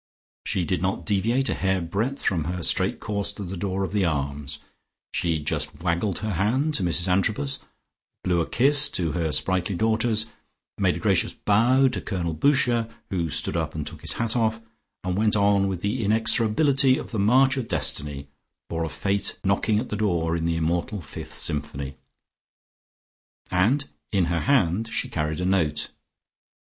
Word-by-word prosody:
She 90 - 0
did 90 0 -1
not 95 +1 -1
deviate 115 +6 +1
a - - +1
hair 95 0 0
breadth 105 +11 -2
from 85 -6 +1
her 90 +1 -3
straight - - +1
course 100 -1 -2
to 100 - -7
the 95 +1 -5
door 95 +1 -2
of 95 - -3
the 105 -1 +1
Arms, 70 -3 -2 0.6
she 85 -2 0
just 75 +2 -3
waggled 90 +2 0
her 110 - -1
hand 120 - +1
to 100 - +1
Mrs 85 +1 +1
Antrobus, 110 +10 +1 0.6
blew 90 -2 +2
a - - -3
kiss 140 +3 +5
to 85 -4 -1
her 80 -1 -1
sprightly 95 +3 0
daughters, 110 +2 +1 0.5
made - - +2
a - - -4
gracious - - +1
bow 120 +6 +3
to - - -4
Colonel 85 -5 -2
Boucher, 120 - +2 0.2
who 85 -4 -1
stood - - 0
up - - -2
and - - -3
took - - -9
his - - 0
hat 115 0 -1
off, 110 -2 +1 0.4
and 90 +1 -1
went 105 0 +3
on 100 -1 +3
with 95 -3 -3
the 110 +4 -1
inexorability 115 +6 +3
of - - -7
the 110 - -2
march 130 +6 +4
of 130 -4 -3
destiny, 70 -6 0 0.4
or 85 0 -1
of 80 - -3
fate 100 0 -1
knocking 100 +2 +2
at 120 +4 -2
the - - -2
door 85 -6 0
in 85 -1 -2
the 85 0 +1
immortal 85 +5 -1
fifth 85 - -9
symphony. 70 -2 -2 1.6
And 115 +11 +2 0.2
in 95 -4 +2
her 85 - +1
hand 110 -5 +2
she 130 - -2
carried 75 -5 -2
a - - -1
note. 80 -6 +1
95 Hz, 175 wpm, -25 LUFS, 85-110 Hz, 1.6 s, kiss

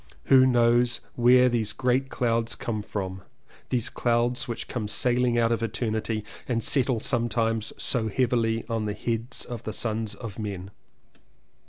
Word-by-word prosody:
who 130 -1 +6
knows 120 0 +3
where 125 +1 +5
these 115 -4 0
great 130 +1 0
clouds 115 -3 0
come 110 -2 -3
from 95 -2 -5 0.2
— - - -27
these 120 -2 0
clouds 120 +1 0
which 115 - -5
come 115 -4 -3
sailing 120 +2 +2
out 115 0 +2
of 115 - 0
eternity 110 -1 -2 0.2
and 115 -3 -1
settle 130 -4 +2
sometimes 115 -1 0
so 115 -3 +2
heavily 115 -1 0
on 115 -2 -2
the 105 -1 -3
heads 115 +2 -2
of 120 -3 -6
the 110 - -5
sons 110 -1 -2
of 110 -1 -8
men. 100 -3 -5
115 Hz, 155 wpm, -26 LUFS, 110-120 Hz, 0.2 s, who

